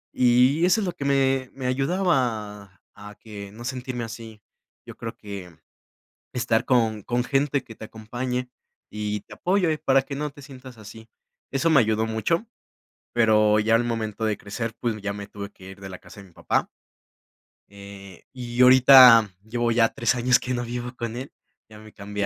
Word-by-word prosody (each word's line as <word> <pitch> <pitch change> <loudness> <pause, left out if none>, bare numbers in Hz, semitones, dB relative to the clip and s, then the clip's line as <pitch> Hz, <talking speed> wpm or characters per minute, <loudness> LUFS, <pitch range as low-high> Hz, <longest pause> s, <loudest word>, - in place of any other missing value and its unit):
Y 125 +5 +3
eso 185 +5 +3
es - - -2
lo 180 - -2
que 160 -5 -7
me 135 -2 +1
me 130 -2 -7
ayudaba 125 - -1
a 105 0 -12
que 100 -3 -10
no 115 +3 -11
sentirme 125 -1 -4
así. 115 -2 -10 0.4
Yo - - -11
creo 115 - -7
que 100 -4 -8 0.8
estar 120 -2 0
con 110 -5 +1
con 120 +3 -1
gente 140 +1 0
que 110 - -13
te 110 - -10
acompañe, 125 +4 -5 0.4
y 105 -1 -4
te 105 - -14
apoye 180 - +1
para 135 -2 +2
que 140 - -7
no 150 0 -3
te 145 0 -15
sientas 130 -3 -13
así. 110 +1 -12 0.4
Eso 140 +4 0
me 155 -5 +5
ayudó 110 0 +1
mucho, 165 - -1 0.7
pero 110 -2 +4
ya 110 +2 +3
al 115 - +2
momento 110 -2 -3
de 110 -1 0
crecer, 110 +3 -5
pues, 115 -3 -2
ya 100 0 -4
me 100 0 -8
tuve 100 -1 -8
que 95 - -16
ir 95 - -12
de 95 0 -9
la 90 - -9
casa 105 - -14
de 95 - -15
mi 85 - -23
papá. - - -1 1.0
Eh, 100 -2 -13
y 125 -1 -3
ahorita 125 -3 +8
llevo 120 +1 -1
ya 115 -1 +3
3 120 +2 0
años 125 +1 +3
que 125 0 -4
no 120 0 -2
vivo 120 +1 -5
con 115 -1 -5
él, 130 +3 -7 0.4
ya 105 -1 -13
me 110 0 -15
cambié 105 0 -4
115 Hz, 185 wpm, -24 LUFS, 105-130 Hz, 1.0 s, ahorita